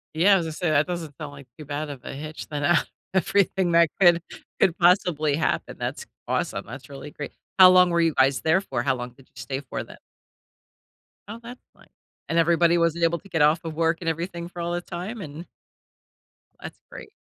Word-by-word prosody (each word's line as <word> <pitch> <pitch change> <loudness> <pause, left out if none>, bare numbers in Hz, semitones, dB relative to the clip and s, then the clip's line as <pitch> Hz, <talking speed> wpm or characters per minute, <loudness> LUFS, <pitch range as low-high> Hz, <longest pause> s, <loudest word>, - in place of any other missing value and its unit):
Yeah, 195 +4 +5
was 170 - -2
gonna 160 - -4
say, 175 +1 -1
that 150 +3 +3
doesn't 165 -5 -5
sound 150 -3 -7
like 140 -2 -13
too 150 - -10
bad 145 +1 -4
of 135 -3 -9
a - - -7
hitch 155 +3 -7
than, 145 -1 -4
uh, 175 +4 +4 0.4
everything 190 -1 +1
that 170 -2 +5
could 175 -3 +6 0.4
could 180 0 +3
possibly 170 -5 +3
happen. 160 - -2
That's 470 - -4 0.2
awesome. - - -2
That's - - -10
really - - -9
great. - - -7 0.3
How 185 - +11
long 180 0 +6
were 170 0 +2
you 165 -2 +2
guys 130 +1 +3
there 160 +4 +3
for? 200 - -3
How - - +1
long 125 0 -6
did 130 +2 -21
you - - -15
stay 135 -1 -4
for 135 - -5
then? - - -13 1.3
Oh, 225 +3 -8
that's 245 +2 -11
fine. - - -22 0.4
And 165 - 0
everybody 170 +1 +4
wasn't 170 0 +1
able 170 0 +2
to 195 - -18
get 160 -3 0
off 150 +3 +4
of 160 -1 -5
work 165 +1 +1
and 165 - -1
everything 170 +1 -4
for 175 0 -8
all 170 0 -2
the 175 - -2
time, 190 +6 -6
and 155 +2 -8 1.2
that's - - -9
great. - - -10
170 Hz, 210 wpm, -24 LUFS, 150-175 Hz, 1.3 s, How